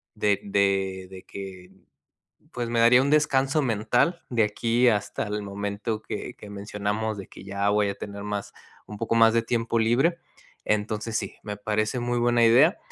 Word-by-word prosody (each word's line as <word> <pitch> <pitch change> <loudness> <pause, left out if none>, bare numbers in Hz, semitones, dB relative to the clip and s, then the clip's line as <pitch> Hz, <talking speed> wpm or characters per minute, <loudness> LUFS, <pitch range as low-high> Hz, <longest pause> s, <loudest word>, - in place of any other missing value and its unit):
de 105 -2 +1
de 95 -2 0
de 95 -1 -11
que 95 -2 -9 0.8
pues, 120 -1 -3
me 120 0 0
daría 120 +2 +6
un 140 - 0
descanso 145 -1 +2
mental 120 - +1
de 120 -3 +2
aquí 115 +3 +1
hasta 105 -3 -1
el 105 0 -3
momento 100 +2 -4
que - - -6
que 105 - -12
mencionamos 105 +1 -3
de 95 - -8
que - - -13
ya 100 +1 -2
voy 105 0 +2
a 100 - -4
tener 100 0 -7
más 105 -1 -4 0.3
un 105 - -8
poco 115 +1 -1
más 115 -1 +6
de 115 - +3
tiempo 115 0 0
libre. 125 +10 +2 0.5
Entonces, 105 +1 -1
sí, - - -5
me 105 -1 -5
parece 110 +3 -1
muy 120 0 -1
buena 120 0 +3
idea. 135 - +5
110 Hz, 175 wpm, -25 LUFS, 100-120 Hz, 0.8 s, daría